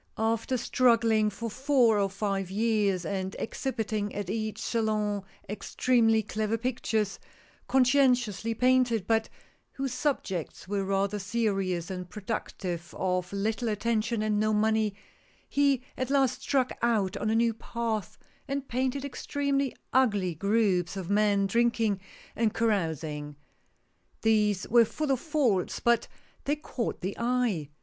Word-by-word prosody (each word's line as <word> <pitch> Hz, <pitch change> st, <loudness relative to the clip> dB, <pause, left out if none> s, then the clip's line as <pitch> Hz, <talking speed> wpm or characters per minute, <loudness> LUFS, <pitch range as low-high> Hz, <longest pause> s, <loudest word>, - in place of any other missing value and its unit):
After 225 Hz, +3 st, 0 dB
struggling 230 Hz, -3 st, +3 dB
for 230 Hz, +3 st, -5 dB
four 250 Hz, -2 st, +3 dB
or 200 Hz, -1 st, +1 dB
five 195 Hz, -1 st, -2 dB
years, 205 Hz, -3 st, +1 dB
and 190 Hz, +2 st, -3 dB
exhibiting 220 Hz, -4 st, -3 dB
at 200 Hz, -2 st, -3 dB
each 215 Hz, 0 st, -3 dB
Salon 215 Hz, -3 st, 0 dB, 0.3 s
ex 210 Hz, -, -7 dB
tremely 225 Hz, -4 st, +3 dB
clever 215 Hz, +2 st, -1 dB
pictures, 225 Hz, -4 st, -1 dB, 0.5 s
conscientiously 250 Hz, -4 st, +3 dB
painted, 250 Hz, -4 st, +3 dB
but 225 Hz, 0 st, +1 dB, 0.4 s
whose 270 Hz, -2 st, -3 dB
subjects 230 Hz, -, -2 dB
were 200 Hz, 0 st, -1 dB
rather 195 Hz, +1 st, 0 dB
serious, 195 Hz, -4 st, -1 dB
and 180 Hz, -1 st, -5 dB
productive 185 Hz, -4 st, -5 dB
of 180 Hz, -1 st, -1 dB
little 220 Hz, +4 st, -1 dB
attention 220 Hz, +1 st, 0 dB
and 210 Hz, -1 st, +1 dB
no 215 Hz, 0 st, +2 dB
money, 215 Hz, -1 st, +2 dB, 0.5 s
he 280 Hz, -3 st, +2 dB
at 255 Hz, 0 st, -3 dB
last 270 Hz, -2 st, +2 dB
struck 260 Hz, -3 st, +1 dB
out 215 Hz, -5 st, +1 dB
on 215 Hz, -, -1 dB
a 220 Hz, -, +2 dB
new 230 Hz, 0 st, +3 dB
path, 225 Hz, -3 st, -3 dB, 0.3 s
and 275 Hz, 0 st, -3 dB
painted 260 Hz, +3 st, -1 dB
extremely 280 Hz, 0 st, -1 dB, 0.2 s
ugly 205 Hz, -9 st, +3 dB
groups 200 Hz, 0 st, +1 dB
of 190 Hz, 0 st, -4 dB
men 205 Hz, -1 st, +3 dB
drinking 230 Hz, -1 st, +1 dB, 0.4 s
and 225 Hz, -2 st, +1 dB
carousing. 160 Hz, -9 st, -1 dB, 0.9 s
These 210 Hz, -3 st, +2 dB
were 235 Hz, +1 st, +6 dB
full 290 Hz, +6 st, -2 dB
of 265 Hz, -, +2 dB
faults, 255 Hz, -, 0 dB
but 235 Hz, -1 st, +2 dB, 0.4 s
they 290 Hz, -, +1 dB
caught 275 Hz, -5 st, -4 dB
the 190 Hz, +3 st, -3 dB
eye. 235 Hz, -, 0 dB
220 Hz, 130 wpm, -28 LUFS, 200-240 Hz, 0.9 s, were